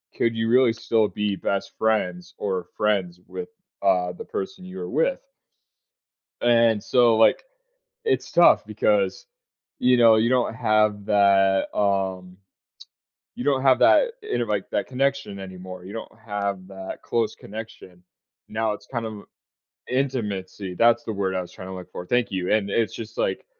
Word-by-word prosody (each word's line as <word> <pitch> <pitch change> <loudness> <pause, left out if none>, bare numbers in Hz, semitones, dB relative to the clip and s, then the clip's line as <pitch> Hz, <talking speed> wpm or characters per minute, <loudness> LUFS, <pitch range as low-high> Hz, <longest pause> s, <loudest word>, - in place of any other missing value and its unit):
could 115 -1 +1
you 115 0 0
really 125 -1 +5
still 110 -1 +1
be 105 -1 -2
best 100 +2 -3
friends 90 -5 -1
or 95 -3 -2
friends 95 -5 0
with, 225 0 -7 0.3
uh, 90 -2 +2
the 90 - -9
person 190 -1 -6
you 185 +1 -8
are - - -5
with? - - 0 1.2
And 115 -3 +3
so, 120 -3 +4
like, 115 - +4 0.6
it's 445 - 0
tough - - +5
because, - - 0 0.5
you 125 0 +4
know, 115 -2 +7
you 110 +2 +2
don't 125 -3 +1
have 110 -3 +1
that, 100 -2 +4
um, 95 -2 -1 1.0
you 125 - -5
don't 135 -2 +2
have 135 -2 +5
that, - - +5
you 425 0 -2
know, - - +1
like, - - -2
that - - -1
connection 135 -5 -1
anymore, 95 -1 -9
you 95 - -9
don't 115 - -7
have 100 -3 -3
that 95 -1 -8
close 115 -2 -1
connection. 100 -4 -10 0.5
Now, 110 0 -1
it's 105 0 -9
kind 115 -1 -4
of 105 -2 -7 0.7
Intimacy, 105 -8 -2
that's 115 +5 +3
the 110 - -3
word 95 -2 -1
I - - 0
was 90 - -8
trying 95 - -9
to 95 - -6
look 90 -1 -9
for. 90 - -6
Thank 120 +2 0
you. 95 0 -1
And 105 -2 +1
it's 110 +2 +1
just, 110 -1 -8
like, - - -1
105 Hz, 165 wpm, -24 LUFS, 95-120 Hz, 1.2 s, know